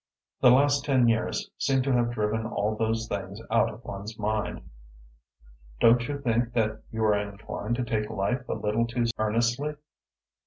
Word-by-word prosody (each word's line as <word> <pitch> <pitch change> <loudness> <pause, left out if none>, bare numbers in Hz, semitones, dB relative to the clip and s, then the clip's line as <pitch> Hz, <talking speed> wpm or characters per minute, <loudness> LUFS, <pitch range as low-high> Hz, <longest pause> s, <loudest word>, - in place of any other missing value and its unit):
The 125 - +7
last 140 +2 +4
ten 130 -4 +3
years 115 -1 0
seem 135 -1 +2
to 135 - 0
have 120 -1 +2
driven 110 0 -1
all 110 -2 -1
those 115 +1 -1
things 100 -1 -5
out 115 - +4
of 110 +3 -13
one's 100 +3 -7
mind." 105 -2 -2 1.1
"Don't 120 +1 +5
you 145 0 -2
think 120 -2 0
that 110 -2 0
you 110 0 -2
are 105 -1 +4
inclined 105 +2 -3
to 125 - -1
take 110 -3 -1
life 120 +6 -1
a - - 0
little 110 +3 0
too 120 0 -1
earnestly?" 115 +7 0
115 Hz, 165 wpm, -27 LUFS, 105-120 Hz, 1.1 s, The